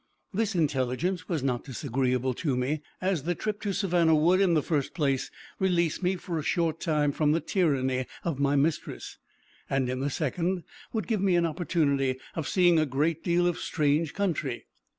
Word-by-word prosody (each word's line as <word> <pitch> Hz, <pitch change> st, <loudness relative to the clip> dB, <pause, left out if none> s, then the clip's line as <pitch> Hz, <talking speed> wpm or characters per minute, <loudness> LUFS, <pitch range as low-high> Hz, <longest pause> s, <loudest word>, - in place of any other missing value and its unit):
This 215 Hz, 0 st, 0 dB
intelligence 155 Hz, +4 st, 0 dB
was 160 Hz, -7 st, -1 dB
not 125 Hz, -3 st, 0 dB
disagreeable 130 Hz, -1 st, -1 dB
to 135 Hz, -1 st, -1 dB
me, 140 Hz, +4 st, -1 dB, 0.2 s
as 185 Hz, -4 st, 0 dB
the 175 Hz, +5 st, -1 dB
trip 210 Hz, +4 st, -3 dB
to 205 Hz, -, -1 dB
Savannah 175 Hz, -5 st, +3 dB
would, 175 Hz, +5 st, +4 dB
in 180 Hz, -4 st, +4 dB
the 150 Hz, -, +2 dB
first 145 Hz, -5 st, -1 dB
place, 140 Hz, -5 st, 0 dB, 0.3 s
release 175 Hz, -4 st, +1 dB
me 185 Hz, +1 st, +1 dB
for 175 Hz, -2 st, -4 dB
a -, -, -4 dB
short 165 Hz, 0 st, 0 dB
time 150 Hz, -4 st, +1 dB
from 150 Hz, +1 st, +2 dB
the 165 Hz, -, +2 dB
tyranny 130 Hz, -9 st, 0 dB, 0.2 s
of 160 Hz, -6 st, -2 dB
my 140 Hz, 0 st, +2 dB
mistress, 145 Hz, +3 st, -1 dB, 0.5 s
and 135 Hz, -2 st, +1 dB
in 130 Hz, -, -3 dB
the 140 Hz, +2 st, 0 dB
second, 170 Hz, +5 st, -1 dB, 0.3 s
would 220 Hz, -5 st, -2 dB
give 215 Hz, -1 st, 0 dB
me 190 Hz, -2 st, +3 dB
an 170 Hz, -1 st, +3 dB
opportunity 145 Hz, -6 st, 0 dB, 0.2 s
of 160 Hz, -, -3 dB
seeing 175 Hz, -3 st, +4 dB
a 155 Hz, -, +2 dB
great 150 Hz, +5 st, 0 dB
deal 175 Hz, 0 st, +2 dB
of 175 Hz, -1 st, 0 dB
strange 150 Hz, 0 st, 0 dB
country. 165 Hz, -10 st, -2 dB
160 Hz, 185 wpm, -28 LUFS, 140-175 Hz, 0.5 s, would